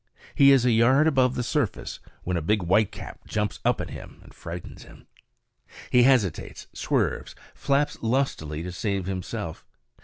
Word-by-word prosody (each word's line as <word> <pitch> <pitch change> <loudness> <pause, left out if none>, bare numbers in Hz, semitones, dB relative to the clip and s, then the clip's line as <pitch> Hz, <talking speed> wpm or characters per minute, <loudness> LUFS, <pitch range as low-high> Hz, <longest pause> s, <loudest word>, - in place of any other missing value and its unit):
He 140 0 +6
is 130 -3 +5
a 125 - +4
yard 130 +6 +4
above 130 -5 +3
the 125 - -1
surface 135 -3 -2 0.2
when 90 - -2
a 85 - 0
big 100 +5 +1
whitecap 95 +4 -1
jumps 105 -1 -2
up - - +2
at - - -5
him - - -10
and - - -16
frightens 85 +1 -8
him. - - -15 0.9
He 125 - +6
hesitates, 120 -10 +1
swerves, - - -1 0.2
flaps 140 +1 0
lustily 110 - -1
to 90 - -5
save 100 0 -2
himself. 95 -1 -5
110 Hz, 155 wpm, -25 LUFS, 90-130 Hz, 0.9 s, He